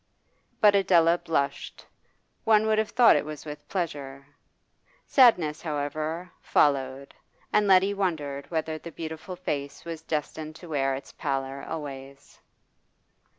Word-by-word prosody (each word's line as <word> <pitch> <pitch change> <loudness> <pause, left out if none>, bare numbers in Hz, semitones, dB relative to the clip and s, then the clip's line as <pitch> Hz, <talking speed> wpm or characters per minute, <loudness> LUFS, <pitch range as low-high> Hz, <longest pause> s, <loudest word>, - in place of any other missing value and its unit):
But 210 -1 +7
Adela 175 -3 +4
blushed, 140 -4 -2 0.6
one 220 -1 +4
would 215 0 +2
have 220 - 0
thought 245 -2 +6
it - - +1
was 150 0 -8
with 150 -1 -9
pleasure. 140 -7 -4 0.8
Sadness, 180 - +4
however, 155 +3 -3
followed, 135 -1 +1 0.4
and 210 -1 +3
Letty 195 +1 +5
wondered 150 -8 -3
whether 160 -1 -2
the 170 - -9
beautiful 160 +3 -7
face 145 -4 -4
was 165 -2 -6
destined 155 0 -4
to 175 0 -12
wear 135 -3 0
its 135 - -9
pallor 135 -1 -3
always. 140 -3 -8
155 Hz, 125 wpm, -27 LUFS, 140-180 Hz, 0.8 s, But